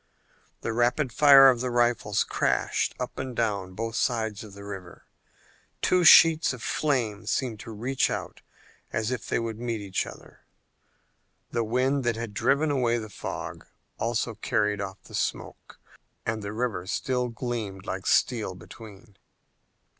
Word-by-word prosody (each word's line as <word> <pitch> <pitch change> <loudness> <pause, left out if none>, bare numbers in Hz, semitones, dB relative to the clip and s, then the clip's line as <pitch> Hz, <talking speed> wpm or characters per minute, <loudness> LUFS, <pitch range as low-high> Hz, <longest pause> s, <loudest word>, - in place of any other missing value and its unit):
The 115 - -2
rapid 120 +2 +1
fire 140 -1 +8
of 125 -3 +4
the 125 - -1
rifles 120 -4 +1
crashed - - 0
up - - -5
and 130 -2 -5
down 100 -5 -1
both 115 +2 -3
sides 110 -4 -1
of 105 -2 -12
the 100 - -10
river, 95 -3 -9 0.8
two 180 -1 +3
sheets 165 -2 +7
of 125 - -9
flame 115 -8 -1
seeming 115 -3 -1
to - - -9
reach 125 +5 0
out - - -5 0.5
as 110 +2 -1
if 125 - -4
they - - +1
would 115 -1 -3
meet 115 -2 -2
each 100 -2 -2
other. - - -13 1.1
The 115 - 0
wind 130 +5 +1
that 120 -1 +1
had 115 -2 -5
driven 140 +7 +2
away 120 -4 +1
the 110 -2 -6
fog - - -7 0.3
also - - -1
carried 105 -1 0
off 95 -1 -7
the - - -16
smoke, - - -4 0.5
and 110 -1 -2
the 100 0 -5
river 110 -5 -3
still 125 +5 -1
gleamed 110 -5 -5
like 95 -1 -4
steel 110 -7 +2
between. 105 +2 -13
115 Hz, 155 wpm, -27 LUFS, 105-125 Hz, 1.1 s, fire